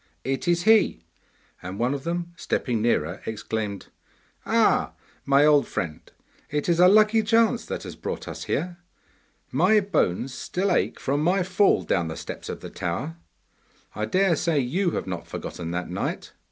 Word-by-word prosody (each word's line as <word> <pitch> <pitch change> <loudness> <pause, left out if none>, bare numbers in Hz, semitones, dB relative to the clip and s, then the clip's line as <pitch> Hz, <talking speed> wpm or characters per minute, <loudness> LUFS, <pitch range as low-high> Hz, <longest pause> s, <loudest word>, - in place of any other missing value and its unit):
It 135 +6 -2
is 175 0 +2
he!' 220 - +4 0.6
and 90 +2 -6
one 120 +4 +1
of 140 0 -5
them 170 0 -3
stepping 120 -8 -1
nearer 90 -6 0
exclaimed, 110 -2 -4 0.6
'Ah, - - +3 0.3
my 140 +1 +5
old 150 -2 +4
friend! 80 -3 -4 0.5
it 150 0 -2
is 170 -1 +2
a 180 - +8
lucky 215 +3 +5
chance 225 +2 +2
that - - -4
has - - -8
brought - - -5
us - - -6
here. 175 0 -2 0.7
My 185 +11 +4
bones 130 - 0
still 190 +8 -2
ache - - 0
from 140 +2 0
my 180 +4 +2
fall 190 +2 +3
down 85 -3 0
the 80 - -6
steps - - -7
of - - -6
the - - -7
tower. 80 +1 -4 0.8
I 105 +1 -2
dare 185 - +2
say 165 +1 0
you 175 +9 0
have - - -3
not 90 -2 -5
forgotten 85 -1 -6
that 90 +1 -3
night! - - -4
150 Hz, 165 wpm, -25 LUFS, -, 0.8 s, a